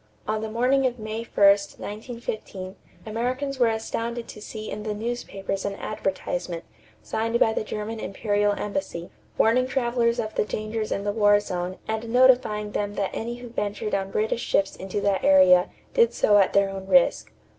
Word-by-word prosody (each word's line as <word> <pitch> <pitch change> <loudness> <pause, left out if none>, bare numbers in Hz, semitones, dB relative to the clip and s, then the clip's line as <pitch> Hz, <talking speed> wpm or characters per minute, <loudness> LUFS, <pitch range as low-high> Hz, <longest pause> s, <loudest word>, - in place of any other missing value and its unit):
On 215 0 -1
the 220 - -4
morning 255 +4 +2
of 245 -1 -4
May 215 0 -5
1, 230 - -6
1915, 205 -1 0 0.3
Americans 255 +5 -2
were 240 - +5
astounded 230 +1 -3
to 210 - -10
see 215 0 -7
in - - -5
the 210 0 -3
newspapers 205 -4 -4
an 200 -1 -2
advertisement, 180 -5 -3 0.4
signed 225 - -1
by 220 - +4
the - - -1
German 215 +1 -5
Imperial 205 0 0
Embassy, 200 -6 -4 0.3
warning 250 +3 +3
travelers 240 -2 +1
of 220 -2 -3
the - - +1
dangers 215 +1 -3
in 200 - -1
the 205 - 0
war 205 -1 +4
zone 180 -2 -4
and 220 +1 -3
notifying 245 -4 +4
them 205 0 -2
that 195 -1 -1
any 235 +1 -3
who 245 0 -9
ventured 210 -1 -3
on 195 -1 0
British 220 +3 -1
ships 195 -4 +1
into 195 +2 -4
that 200 -1 +1
area 185 -2 +6 0.2
did 235 0 +3
so 205 -1 +5
at 195 - +3
their 200 0 +3
own 190 -1 -7
risk. 270 +5 +3
215 Hz, 175 wpm, -25 LUFS, 200-235 Hz, 0.4 s, area